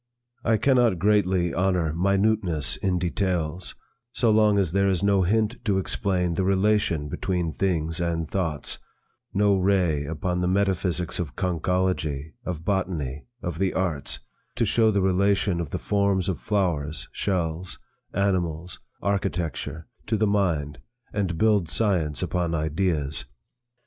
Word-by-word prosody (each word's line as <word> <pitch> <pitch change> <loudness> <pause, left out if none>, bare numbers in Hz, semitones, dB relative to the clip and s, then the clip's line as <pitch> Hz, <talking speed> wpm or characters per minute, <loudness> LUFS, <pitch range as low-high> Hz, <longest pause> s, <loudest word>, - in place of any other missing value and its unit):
I 110 -1 +3
cannot 125 -6 +3
greatly 95 -2 +2
honor 90 -4 +1
minuteness 95 -3 +1
in 95 -2 0
details, 90 -2 -1 0.4
so 115 -3 +2
long 105 -1 +4
as 95 -5 +1
there 100 +1 +2
is 95 -2 0
no 100 -1 +4
hint 110 +6 +1
to 100 -3 +2
explain 90 -2 0
the 95 - 0
relation 95 -5 +2
between 85 +1 -2
things 80 -3 0
and 85 -2 -1
thoughts; 80 -6 -2 0.5
no 100 0 +3
ray 90 -6 +2
upon 90 +4 -2
the 90 - +1
metaphysics 90 -2 0
of 75 -8 -4
conchology, 90 -4 -1
of 85 -6 -5
botany, 85 -9 -2 0.2
of 85 -2 -3
the 95 -1 0
arts, 85 -7 -1 0.4
to - - +1
show 115 -1 +3
the 100 -3 +1
relation 95 -1 +2
of 80 - -5
the - - -3
forms 100 -2 +1
of 95 - -1
flowers, 85 -8 -1
shells, 90 -2 -2 0.3
animals, 90 -3 -1 0.2
architecture, 85 -5 -2 0.2
to 110 - +1
the 110 - +2
mind, 85 -8 0 0.3
and 95 -5 -1
build 105 -4 +3
science 85 - +1
upon 85 -2 -1
ideas. 80 -3 -1
90 Hz, 135 wpm, -25 LUFS, 80-100 Hz, 0.5 s, long